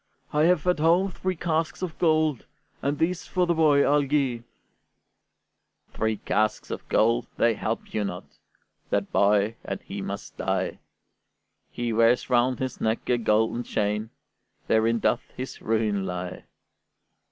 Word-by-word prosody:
I 150 +1 +4
have 175 -2 +3
at 180 -3 +2
home 175 +5 +3
three 185 +1 -3
casks 160 +1 -1
of 175 -3 -4
gold, 155 -5 +2 0.3
And 145 +1 -1
these 170 +3 -1
for 180 -1 +1
the 170 - +2
boy 150 -3 +4
I'll 145 +1 +4
gi'e." 135 -4 0 1.5
"Three 110 0 -1
casks 110 +2 -1
of - - -6
gold, 115 +2 +2
they 115 - +3
help 110 +1 -4
you 105 - 0
not: 90 -3 -4 0.7
That - - -1
boy, 105 +2 +3
and - - -4
he - - -6
must - - -6
die! - - -1 0.9
He 120 -1 -3
wears 115 +3 +3
round 125 +1 +3
his 130 0 -4
neck 110 +1 -1
a 120 - +2
golden 110 +1 +2
chain; 105 -1 -1 0.6
Therein 115 +1 +2
doth 120 +2 0
his 130 +1 -6
ruin 110 -3 0
lie." 90 -1 -5
120 Hz, 145 wpm, -26 LUFS, 110-155 Hz, 1.5 s, I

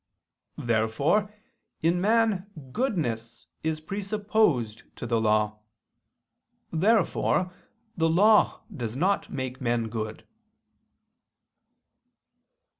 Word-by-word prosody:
Therefore 120 - +1 0.5
in 170 +2 +2
man 215 -2 +2 0.2
goodness 120 - -2 0.2
is 160 -1 -1
presupposed 195 - 0
to - - -6
the 115 -1 +1
law. 105 -1 +1 1.1
Therefore 185 -1 +2 0.4
the 165 -2 +2
law 205 +6 +4
does 120 -5 -4
not 185 +8 +1
make 130 0 -4
men 120 -2 0
good. 110 -1 -5
155 Hz, 80 wpm, -27 LUFS, -, 1.1 s, law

